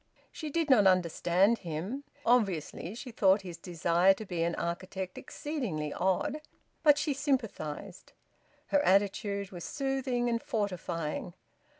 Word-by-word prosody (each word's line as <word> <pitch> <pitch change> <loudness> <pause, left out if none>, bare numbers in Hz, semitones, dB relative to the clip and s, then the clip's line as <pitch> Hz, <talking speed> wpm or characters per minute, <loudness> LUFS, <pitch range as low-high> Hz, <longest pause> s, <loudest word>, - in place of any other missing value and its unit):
She 310 - -6
did 330 +1 0
not 225 -8 +6
understand 185 +4 +3
him; 185 - -4 0.2
obviously 195 -5 +1
she 250 +1 -7
thought 195 -2 +3
his 175 -3 -7
desire 175 +2 +3
to 220 - -8
be 175 -4 -3
an 170 0 +1
architect 185 +2 -4
exceedingly 205 - -4
odd; 190 - 0 0.4
but 295 -2 +6
she 295 -1 0
sympathised. 225 - -3 0.6
Her 290 0 +3
attitude 200 0 +1
was 175 -3 -7
soothing 270 -3 -1
and 230 -1 0
fortifying. 180 -5 -3
195 Hz, 125 wpm, -31 LUFS, 175-250 Hz, 0.6 s, not